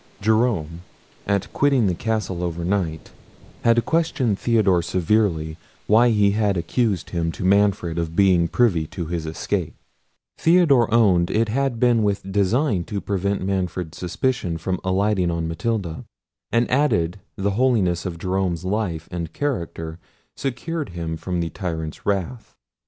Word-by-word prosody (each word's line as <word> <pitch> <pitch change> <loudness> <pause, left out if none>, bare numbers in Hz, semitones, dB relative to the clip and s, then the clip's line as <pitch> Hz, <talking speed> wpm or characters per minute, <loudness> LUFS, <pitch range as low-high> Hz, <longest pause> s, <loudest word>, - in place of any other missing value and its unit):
Jerome, 105 -7 +1 0.5
at 100 -1 -1
quitting 135 -5 +3
the 95 - +2
castle 105 -2 -2
overnight, 85 -1 -2 0.5
had 115 0 +3
questioned 145 -10 0
Theodore 105 -7 +3
severely 85 -3 0 0.3
why 115 +3 +5
he 105 -3 +3
had 105 -2 +1
accused 95 +2 -1
him 85 -2 -1
to 75 - -5
Manfred 95 -4 +2
of 85 -1 -3
being 90 -3 +4
privy 85 -6 +2
to 85 - -5
his 80 -1 -4
escape. 80 - -3 0.6
Theodore 160 -9 +4
owned 95 -7 +4
it 110 +2 +1
had 135 0 0
been 120 -2 +4
with 100 -2 -1
design 100 - +1
to 100 - -3
prevent 100 0 -2
Manfred's 90 -4 -3
suspicion 90 0 -1
from 90 +3 -2
alighting 95 -1 +1
on 85 -1 -2
Matilda; 85 0 -3 0.5
and 120 0 +2
added, 100 - +1 0.2
the 100 +1 -1
holiness 100 -7 +2
of 90 -3 -4
Jerome's 90 -1 -1
life 95 -5 -2
and 85 -2 -4
character 85 - -3 0.4
secured 145 - -3
him 80 -1 -3
from 90 +1 -3
the 85 - -3
tyrant's 80 -4 -5
wrath. 100 +4 -2
95 Hz, 140 wpm, -22 LUFS, 85-115 Hz, 0.6 s, why